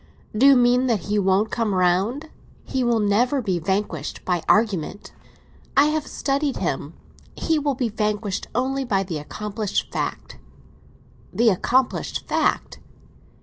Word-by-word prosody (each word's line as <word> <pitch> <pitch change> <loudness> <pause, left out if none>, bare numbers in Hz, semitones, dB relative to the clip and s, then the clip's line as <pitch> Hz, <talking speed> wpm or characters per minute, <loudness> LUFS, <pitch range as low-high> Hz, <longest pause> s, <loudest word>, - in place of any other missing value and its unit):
"Do 255 +6 +5
you 280 - +8
mean 245 +1 +4
that 225 -6 +1
he 210 0 -1
won't 195 +2 +2
come 225 -5 0
round?" 195 - +1 0.3
"He 260 -1 -2
will 240 -2 +2
never 225 +7 +2
be 190 -8 -1
vanquished 185 -4 -3
by 175 -2 0
argument. 205 -4 +1 0.6
I 280 - +7
have 310 -1 -2
studied 280 0 -1
him. - - -3 0.4
He 320 -1 0
will 285 -2 -1
be 245 -2 -1
vanquished 210 -2 -2
only 265 +3 0
by 195 -6 0
the 170 -5 -4
accomplished 210 +6 -3
fact." - - -4 0.9
"The 235 0 +3
accomplished 245 +6 0
fact?" - - 0
220 Hz, 140 wpm, -23 LUFS, 195-255 Hz, 0.9 s, you